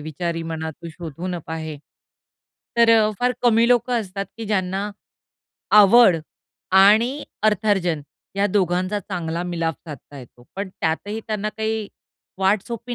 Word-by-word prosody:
विचारी 165 +2 -4
मना 160 0 -4
तू 170 +2 -11
शोधून 170 +2 -6
पाहे." 160 -1 -5 1.0
तर 235 -1 +5
अ, 215 0 +3
फार 250 0 +2
कमी 235 -1 +4
लोकं 245 0 +2
असतात 195 -1 -5
की 230 - -6
ज्यांना 195 0 -1 0.9
आवड 205 -2 +7 0.7
आणि 230 +8 +4 0.2
अर्थार्जन 205 -6 +1 0.4
या 200 +1 +2
दोघांचा 185 0 0
चांगला 170 -3 -4
मिलाप 165 -2 -1
साधता 145 -1 -10
येतो. 120 -1 -15
पण 200 0 -3
त्यातही 190 +5 -3
त्यांना 215 -1 -2
काही 220 -1 -2 0.5
वाट 195 +1 +2
सोपी 235 +1 -5
195 Hz, 130 wpm, -22 LUFS, 165-220 Hz, 1.0 s, आवड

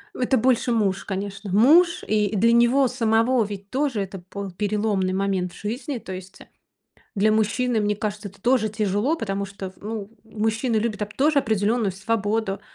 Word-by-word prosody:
Это 255 +1 +1
больше 245 0 +2
муж, 200 -4 0
конечно. 200 0 -5
Муж, 325 - +5
и 210 -1 +1
для 230 +4 +4
него 240 +3 +4
самого 230 0 +2
ведь 200 -1 -8
тоже 265 -6 0
это 195 -1 -6
был 200 -2 -5
переломный 205 -1 0
момент 190 -2 -1
в - - -13
жизни. 245 +5 -4
То 190 - -8
есть, 185 +1 -10
э, - - -13 0.7
для 215 +1 +3
мужчины, 220 +2 +1
мне 210 0 0
кажется, 205 -1 -4
это 195 +1 -19
тоже 245 -3 +3
тяжело, 215 - 0
потому 200 -8 -3
что 195 -1 -7
в - - -24
ну, 210 -1 -6
мужчины 225 +2 -1
любят 215 -1 -1
оп 210 +1 -5
тоже 290 +1 +3
определённую 220 -3 +1
свободу. 205 0 -1
215 Hz, 175 wpm, -23 LUFS, 200-235 Hz, 0.7 s, Муж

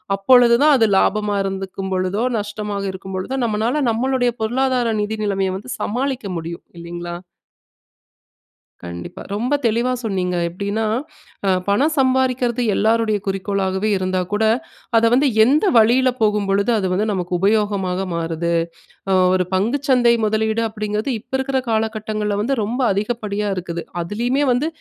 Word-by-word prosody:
அப்பொழுது 235 +4 +5
தான், 300 -1 +6
அது 225 - +4
லாபமா 210 +1 +1
இருந்துக்கும்பொழுதோ, 190 +1 -2 0.2
நஷ்டமாக 210 -1 -4
இருக்கும்பொழுதோ 190 +6 -5
நம்மனால 230 +6 0
நம்மளுடைய 245 +1 +1
பொருளாதார 245 0 +1
நிதி 215 +1 -2
நிலமைய 195 -2 0
வந்து 230 +6 -9
சமாளிக்க 250 -1 -2
முடியும், 165 +1 -7
இல்லைங்ளா? 175 0 -6 1.7
கண்டிப்பா. 85 0 -8
ரொம்ப 245 +6 -1
தெளிவா 235 +3 +1
சொன்னீங்க. 185 -4 -1
எப்படீன்னா, 200 +5 -2 0.6
அ - - +3 0.2
பணம் 275 +10 +2
சம்பாறிக்கறது 260 -2 +1
எல்லாருடைய 220 0 +2
குறிக்கோளாகவே 195 +1 -1
இருந்தா 185 0 -1
கூட, 210 +2 +1 0.5
அத 225 - +4
வந்து 275 +4 +4 0.2
எந்த 285 - +3
வழியில 245 +4 +5
போகும்பொழுது 205 0 +2
அது 190 -3 0
வந்து 200 +4 +1
நமக்கு 180 -2 -3
உபயோகமாக 195 -2 +1
மாறுது? 165 0 -2 0.6
அ - - +4 0.2
ஒரு 185 -1 +2
பங்கு 220 +9 +1
சந்தை 245 -2 +5
முதலீடு 220 +1 0
அப்படீங்கிறது 215 +3 -3
இப்ப - - -25
இருக்கற 265 0 0
காலகட்டங்கள்ல 215 -2 -1
வந்து, 250 +6 0
ரொம்ப 240 +6 -2
அதிகப்படியா 210 0 -2
இருக்குது. 170 -1 -4 0.2
அதுலேயுமே 240 +10 -1
வந்து 250 +5 +1
210 Hz, 130 wpm, -20 LUFS, 195-240 Hz, 1.7 s, தான்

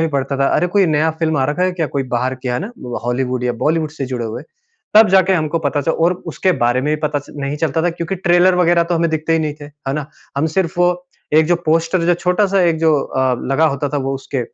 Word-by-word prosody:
भी 165 - +2
पड़ता 140 -1 -2
था, 135 0 +2
अरे, 180 - +2
कोई 195 +1 +2
नया 155 0 +2
फ़िल्म 160 -1 -1
आ 130 - +2
रखा 175 +5 -1
है 185 0 +1
क्या, 170 -3 -2
कोई 140 -1 -2
बाहर 130 +2 -1
कि 130 - -3
है 125 - 0
ना? 210 +6 -6
वो 120 -1 -6
हॉलीवुड 125 0 -1
या 125 - +1
बॉलीवुड 155 -1 +1
से 140 -4 -5
जुड़े 125 -2 -4
हुए। 110 - -6 0.5
तब 215 0 +7
जाके 190 0 +4
हमको 160 -1 0
पता 145 +1 0
च - - -4
और 165 +2 +2
उसके 185 - 0
बारे 120 +1 +2
में 150 +1 +1
भी 150 - -5
पता 150 -1 0
च 140 - -13
नहीं 140 +1 -3
चलता 160 +1 -1
था 175 - +2
क्योंकि 170 +2 -4
ट्रेलर 180 0 +3
वगैरह 175 -1 +3
तो 175 - -1
हमें 170 0 +1
दिखते 160 +1 -1
ही 165 - +3
नहीं 155 -2 -2
थे, - - -8
है 145 -2 -7
ना? 150 -1 -3 0.3
हम 145 +3 +1
सिर्फ 175 -3 0
वो 180 0 +1 0.3
एक 160 - +6
जो 175 +1 +3
पोस्टर 165 +3 +1
जो 175 - +4
छोटा-सा 190 +3 +1
एक 165 -2 +2
जो 160 -1 +3
अ, 130 -1 0 0.2
लगा 155 +4 +3
होता 140 -1 -1
था 145 - -3
वो 135 0 -2
उसके 135 -1 -4
160 Hz, 270 wpm, -18 LUFS, 140-175 Hz, 0.5 s, तब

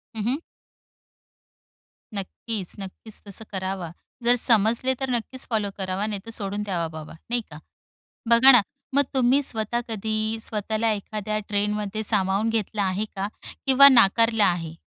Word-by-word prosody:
हं, 215 - -3
हं. 250 +5 +1 1.8
नक्कीच, 200 0 -5
नक्कीच. 195 +3 -8
तसं 200 +2 -7
करावा. 190 -3 -4 0.3
जर 240 +1 +5
समजले 235 +2 +3
तर 265 -1 -2
नक्कीच 250 +2 -2
फॉलो 215 -3 0
करावा 190 +1 -2
नाहीतर 210 +1 -5
सोडून 205 -1 -3
द्यावा 175 -5 -2
बाबा, 155 -1 -9 0.2
नाही 240 0 +1
का. 150 - -9 0.7
बघा 235 +3 +8
ना, 245 -4 +7 0.3
मग 285 - +5
तुम्ही 260 +2 +4
स्वतः 230 0 -1
कधी 220 0 -2
स्वतःला 220 +1 -1
एखाद्या 215 +1 -3
ट्रेंडमध्ये 210 +1 -1
सामावून 200 +1 +1
घेतलं 215 -2 -1
आहे 195 +2 0
का? 195 +1 -2 0.4
किंवा 275 +1 +8
नाकारलं 230 -2 +4
आहे? 165 -3 0
215 Hz, 135 wpm, -24 LUFS, 195-230 Hz, 1.8 s, बघा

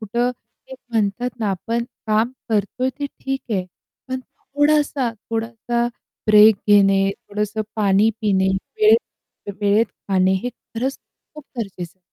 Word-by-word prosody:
कुठं 235 +3 0 0.4
ते 265 - -9 0.2
म्हणतात 225 +3 0
ना 210 - +1
आपण 230 +5 -2 0.2
काम 220 +3 +2 0.2
करतोय 225 +5 0
ते 285 - -1
ठीक 270 0 -2
आहे, 185 -4 0 0.4
पण 260 0 -3
थोडासा, 290 -2 0 0.2
थोडासा 230 +1 -1 0.4
ब्रेक 215 0 +8
घेणे, 195 -1 +5
थोडंसं 210 +2 -3
पाणी 205 +1 +4
पिणे, 190 -3 +2 0.3
वेळ 430 +1 +7 0.6
वेळेत 205 +2 +3 0.2
खाणे 190 -1 +3
हे 245 - -1
खरंच 245 +2 -5 0.4
खूप 300 -2 -10
गरजेचं 185 -5 -5
आहे. - - -46
220 Hz, 130 wpm, -21 LUFS, 200-250 Hz, 0.6 s, ब्रेक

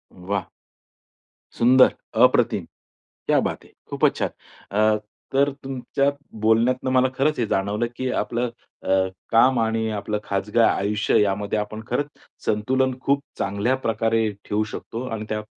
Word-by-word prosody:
वाह! 95 +1 -3 1.1
सुंदर. 130 +2 +6 0.3
अप्रतिम, - - +3 0.6
क्या - - +4
बात - - -6
है! - - -20 0.2
खूपचं - - +3
छान. - - 0 0.5
अ, 110 0 +4 0.4
तर 140 +1 +3
तुमच्या 135 +1 0 0.3
बोलण्यातून 120 +4 +2
मला 130 0 +4
खरंच 150 +2 +1
हे 120 - +2
जाणवलं 105 +4 0
की 130 -1 -2
आपलं 120 0 -2 0.3
अ, - - -5 0.4
काम 125 +2 +5
आणि 110 0 0
आपलं 105 +1 -2
खाजगी 100 +3 -1
आयुष्यामध्ये 105 -1 +2
आपण 110 +1 -5
खरंच 145 +4 -1 0.4
संतुलन 130 +5 +1
खूप 140 +1 +1 0.2
चांगल्या 100 +6 0
प्रकारे 115 -2 +1 0.2
ठेवू 105 +1 0
शकतो. 115 +2 -6
आणि 110 -1 -4
त्यात 105 0 -2
115 Hz, 130 wpm, -23 LUFS, 105-130 Hz, 1.1 s, सुंदर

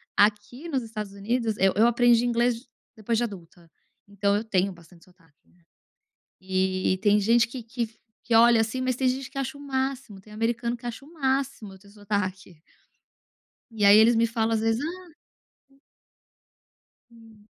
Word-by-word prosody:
Aqui 210 +8 +1
nos 265 -5 -1
Estados 215 -3 -7
Unidos 220 +2 -2
eu 190 0 +3
eu 220 +4 +5
aprendi 240 0 +3
inglês 240 +1 0 0.3
depois 225 +1 -2
de 240 - +1
adulta, 175 -6 -9 0.4
então 200 0 0
eu 210 - -1
tenho 195 -3 0
bastante 170 -1 -17
sotaque, 170 -5 -28
né. 175 -1 -30 0.8
E 185 0 0
tem 205 0 +4
gente 230 +3 +3
que 245 0 -7
que 230 0 -4 0.4
que 235 - -2
olha 230 0 +6
assim, 225 +3 -3
mas 255 -1 -1
tem 255 +1 +1
gente 260 +1 -4
que 275 - -11
acha 275 +1 -3
o - - -12
máximo, 265 -6 -4
tem 210 - -18
americano 235 +2 -2
que 240 - -15
acha 240 +2 -6
o 305 - -17
máximo 270 - -2
eu 190 - -15
ter 200 +1 -19
sotaque. 200 -4 -4 1.1
E 220 -2 -1
aí 200 +1 +8
eles 225 +2 +5
me 230 +1 +3
falam 225 -1 -1
às 220 - 0
vezes, 225 +1 0
"ah" 360 +3 -6 2.0
Hum. 225 -2 -19
225 Hz, 170 wpm, -25 LUFS, 200-245 Hz, 2.0 s, aí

